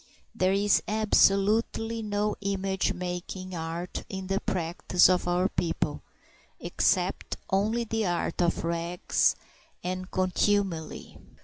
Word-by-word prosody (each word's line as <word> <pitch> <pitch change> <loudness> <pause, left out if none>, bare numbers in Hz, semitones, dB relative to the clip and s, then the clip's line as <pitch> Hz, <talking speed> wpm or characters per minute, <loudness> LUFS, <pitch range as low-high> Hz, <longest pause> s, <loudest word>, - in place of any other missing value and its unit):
There 185 +1 +2
is 200 +1 +3
absolutely 220 +2 +2
no 210 0 -1
image 195 -1 0
making 180 +1 -5
art 165 +1 -4
in 190 -1 -5
the 195 +1 0
practice 175 0 +2
of 180 -1 +1
our 180 +1 +2
people, 165 -5 -2 0.6
except - - 0
only 215 +5 +1
this 225 -2 -1
art 175 0 -1
of 170 -1 +1
rags 170 +1 +1 0.5
and 185 +1 -4
contumely. 185 -2 -1
185 Hz, 110 wpm, -28 LUFS, 175-205 Hz, 0.6 s, is